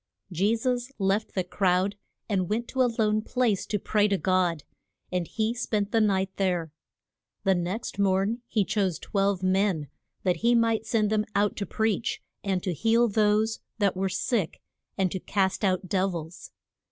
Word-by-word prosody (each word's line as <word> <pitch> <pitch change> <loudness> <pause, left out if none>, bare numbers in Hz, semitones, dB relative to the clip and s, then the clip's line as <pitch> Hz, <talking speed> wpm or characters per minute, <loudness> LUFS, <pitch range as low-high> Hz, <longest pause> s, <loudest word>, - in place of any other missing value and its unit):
JE 195 +6 +2
SUS 245 +2 -1
left 195 +2 0
the 185 - +1
crowd, 185 +2 +1 0.3
and 190 -5 0
went 230 +3 -1
to 260 - 0
a 250 - +4
lone 215 -1 +2
place 230 -4 0
to 210 - 0
pray 210 +1 +2
to 200 -1 +1
God. 180 -5 +1 0.5
And 180 -2 -1
he 220 +1 -1
spent 215 -4 -1
the 225 - +3
night 195 -2 +1
there. 180 -5 0 0.7
The 195 - +4
next 185 +4 -3
morn 200 +4 +1
he 210 -3 +1
chose 190 -5 0
twelve 195 -2 0
men, 185 -5 +1 0.3
that 180 -2 +2
he 235 +1 +3
might 225 -1 +2
send 215 -2 +1
them 215 -1 +2
out 205 +1 +2
to 200 - -3
preach, 220 +1 0 0.2
and 190 -3 -1
to 185 - -1
heal 230 +7 +3
those 215 +1 +2 0.2
that 200 -4 +2
were 190 +1 0
sick, 185 0 -1 0.4
and 190 -3 +1
to 190 - -3
cast 190 +2 0
out 185 -1 +1
dev 190 0 0
ils. 165 +1 -7
200 Hz, 175 wpm, -27 LUFS, 185-220 Hz, 0.7 s, a